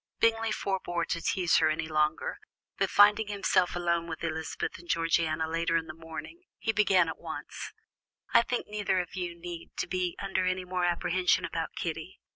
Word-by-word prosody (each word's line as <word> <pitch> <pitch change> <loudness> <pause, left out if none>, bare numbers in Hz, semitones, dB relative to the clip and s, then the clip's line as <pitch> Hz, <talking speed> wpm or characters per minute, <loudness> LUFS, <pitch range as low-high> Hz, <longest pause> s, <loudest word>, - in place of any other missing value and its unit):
Bingley 225 -1 +3
forbore 185 -4 -1
to 170 - -2
tease 175 0 +2
her - - +4
any 155 +1 -1
longer; 155 - 0 0.4
but - - +2
finding 205 +1 +6
himself 195 -3 +1
alone 170 -1 0
with 160 -1 -6
Elizabeth 160 +2 -3
and 175 - -15
Georgiana 165 -1 +1
later 165 +1 +1
in 165 - -2
the 175 - -7
morning, 165 - -9
he 225 - -1
began 195 -4 +4
at 160 - -5
once: - - -6 0.6
"I 235 - +8
think 245 +1 -2
neither 210 -3 0
of 175 -2 -4
you 175 -2 -3
need 170 -1 -7 0.2
be 180 -2 -1
under 195 -1 -1
any 185 0 0
more 180 0 0
apprehension 175 +1 +2
about 165 -1 -4
Kitty. 165 +1 -4
175 Hz, 175 wpm, -29 LUFS, 165-195 Hz, 0.6 s, I